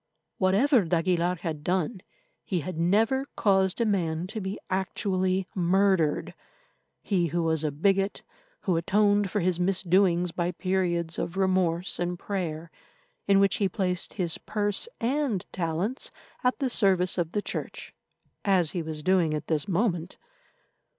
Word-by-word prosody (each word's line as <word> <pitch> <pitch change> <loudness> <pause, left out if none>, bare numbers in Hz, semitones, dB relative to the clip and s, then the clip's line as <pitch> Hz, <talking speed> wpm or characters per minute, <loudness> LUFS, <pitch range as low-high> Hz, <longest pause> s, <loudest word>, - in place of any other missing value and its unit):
Whatever 210 +6 +4
d'Aguilar 175 +1 +1
had 160 -4 -5
done, 185 +3 -1 0.4
he 180 -4 -2
had 180 +4 -5
never 225 +10 +2
caused 190 -1 +2
a 235 - +2
man 170 -5 0
to 215 +3 -5
be 190 +1 -4
actually 190 0 0
murdered, 185 -3 +2 0.7
he 180 -4 +1
who 170 +2 -1
was 160 -1 +1
a 155 - +1
bigot, 195 +6 +1 0.4
who 180 -5 +1
atoned 205 +3 +2
for 205 +1 -1
his 180 0 0
misdoings 180 -1 +2
by 175 +1 -2
periods 175 -3 -1
of 170 - -4
remorse 185 -2 +1
and 175 0 -1
prayer, 170 -4 -4 0.6
in 195 -1 +5
which 195 0 +3
he 200 -2 +1
placed 180 -1 -2
his 175 -5 0
purse 205 - -1
and 245 -5 0
talents 180 - -1 0.3
at 250 0 +2
the 270 -3 -1
service 185 -5 +3
of 170 -1 -2
the 210 - 0
Church, - - -6 0.5
as 185 -6 +2
he 175 - -2
was 155 -1 -6
doing 175 -4 +2
at 150 - -4
this 155 -3 0
moment. 180 -3 -1
185 Hz, 145 wpm, -27 LUFS, 170-200 Hz, 0.7 s, in